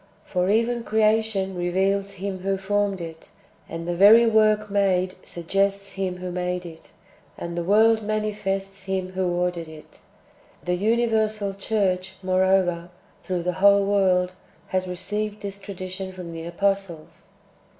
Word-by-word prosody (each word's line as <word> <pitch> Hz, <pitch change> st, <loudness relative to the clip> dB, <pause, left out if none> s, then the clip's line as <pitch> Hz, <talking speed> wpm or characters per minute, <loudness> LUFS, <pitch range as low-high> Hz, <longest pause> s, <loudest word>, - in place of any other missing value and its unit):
For 180 Hz, 0 st, 0 dB
even 230 Hz, +3 st, +1 dB
creation 220 Hz, -3 st, +1 dB
reveals 195 Hz, +3 st, 0 dB
Him 195 Hz, 0 st, -5 dB
who 195 Hz, +1 st, -1 dB
formed 200 Hz, 0 st, 0 dB
it, 165 Hz, -1 st, -9 dB, 0.4 s
and 165 Hz, +1 st, -6 dB
the 175 Hz, -, 0 dB
very 210 Hz, +6 st, +8 dB
work 215 Hz, -1 st, +3 dB
made 185 Hz, -2 st, +2 dB
suggests 195 Hz, +3 st, -1 dB
Him 190 Hz, -2 st, -3 dB
who 180 Hz, 0 st, -5 dB
made 180 Hz, 0 st, -2 dB
it, 165 Hz, -1 st, -12 dB, 0.4 s
and 170 Hz, 0 st, -5 dB
the 170 Hz, -, -2 dB
world 220 Hz, +4 st, +4 dB
manifests 205 Hz, -2 st, -3 dB
Him 190 Hz, -1 st, -2 dB
who 185 Hz, 0 st, -1 dB
ordered 175 Hz, -1 st, -1 dB
it. 155 Hz, -1 st, -13 dB, 0.6 s
The 180 Hz, -, -1 dB
uni 225 Hz, +6 st, +2 dB
versal 215 Hz, -3 st, 0 dB
church, 195 Hz, -2 st, -1 dB
moreover, 185 Hz, -2 st, +2 dB, 0.3 s
through 180 Hz, -3 st, -3 dB
the 180 Hz, -, 0 dB
v/hole 200 Hz, +2 st, +5 dB
world, 185 Hz, -2 st, +2 dB, 0.4 s
has 185 Hz, 0 st, -1 dB
received 205 Hz, +4 st, -4 dB
this 200 Hz, 0 st, -5 dB
tradition 190 Hz, -1 st, -6 dB
from 180 Hz, -2 st, -8 dB
the 165 Hz, 0 st, -6 dB
apostles. 195 Hz, -2 st, -2 dB
195 Hz, 140 wpm, -24 LUFS, 180-205 Hz, 0.6 s, very